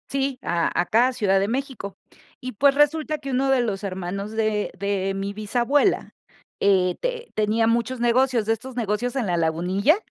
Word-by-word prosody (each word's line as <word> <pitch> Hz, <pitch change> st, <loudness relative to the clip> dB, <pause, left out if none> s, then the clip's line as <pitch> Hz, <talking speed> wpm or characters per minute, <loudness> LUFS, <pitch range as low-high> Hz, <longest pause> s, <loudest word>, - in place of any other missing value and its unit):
Sí, 275 Hz, -1 st, -1 dB
ah, 170 Hz, -1 st, 0 dB
acá 225 Hz, +8 st, +3 dB
a 260 Hz, -, -2 dB
Ciudad 200 Hz, -5 st, +2 dB
de 195 Hz, -, 0 dB
México 255 Hz, -4 st, -4 dB, 0.4 s
y, 255 Hz, 0 st, -5 dB
pues 275 Hz, +6 st, +3 dB
resulta 305 Hz, +1 st, +2 dB
que 275 Hz, -1 st, -6 dB
uno 265 Hz, +1 st, +1 dB
de 265 Hz, -2 st, +3 dB
los 210 Hz, -4 st, -3 dB
hermanos 195 Hz, +1 st, -4 dB
de 215 Hz, -1 st, -1 dB
de 195 Hz, -1 st, -1 dB
mi 195 Hz, +1 st, -3 dB
bisabuela, 240 Hz, -, 0 dB, 0.4 s
eh, 185 Hz, -3 st, +3 dB
te -, -, -4 dB
tenía 215 Hz, +1 st, +1 dB
muchos 235 Hz, +2 st, 0 dB
negocios, 240 Hz, -1 st, +2 dB
de 225 Hz, -, +2 dB
estos 245 Hz, +3 st, -8 dB
negocios 235 Hz, +2 st, -1 dB
en 250 Hz, -6 st, -1 dB
la 175 Hz, -1 st, 0 dB
Lagunilla 180 Hz, -, +2 dB
225 Hz, 180 wpm, -23 LUFS, 200-265 Hz, 0.4 s, acá